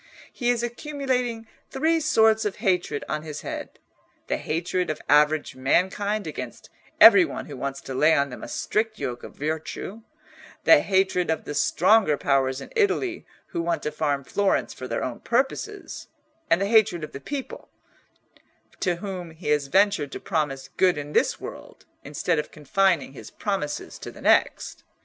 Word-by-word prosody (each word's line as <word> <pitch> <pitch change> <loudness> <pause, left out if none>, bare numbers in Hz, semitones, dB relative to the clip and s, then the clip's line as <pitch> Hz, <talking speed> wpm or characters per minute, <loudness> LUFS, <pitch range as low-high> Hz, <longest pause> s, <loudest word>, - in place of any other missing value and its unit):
He 245 -2 -1
is 240 -1 +1
accumulating 250 -2 -2 0.2
three 320 +4 +1
sorts 220 -7 +3
of 210 -2 -2
hatred 180 -8 0
on 155 0 -2
his 155 -1 -7
head—the - - -7
hatred 175 +3 -2
of 155 - -3
average 150 +1 +3
mankind 190 +10 0
against - - -7 0.3
every 380 - +10
one 330 - -5
who 145 - -8
wants 135 +1 -4
to 135 - -7
lay 155 +5 +4
on 140 -1 +1
them 125 - -8
a - - -7
strict 220 0 -1
yoke 120 -8 -4
of - - -11
virtue; 160 +8 -4 0.6
the 320 - +7
hatred 190 -5 +1
of 160 - 0
the - - -5
stronger 180 +1 +3
powers 135 -1 +1
in - - -11
Italy 390 -5 0 0.2
who 170 - -2
want 170 -2 -1
to 150 - -2
farm 145 -3 -1
Florence 200 +8 0
for 130 - -7
their 115 - -2
own 125 -2 -4
purposes; 275 - -2 0.4
and 165 - +4
the 195 - +1
hatred 210 -6 +3
of 155 - -6
the 140 - -8
people, 285 -2 -6 1.1
to 180 -3 +1
whom 185 -1 -6
he 160 0 -7
has 150 -2 +2
ventured 185 -4 +2
to - - -5
promise 145 -4 -2
good 185 -4 +4
in 145 0 -6
this - - +2
world, - - -10 0.2
instead 150 +3 -1
of 150 - -4
confining 170 -1 +1
his - - -10
promises 195 -8 -4
to - - -7
the - - -13
next. - - +2
175 Hz, 170 wpm, -25 LUFS, 150-220 Hz, 1.1 s, every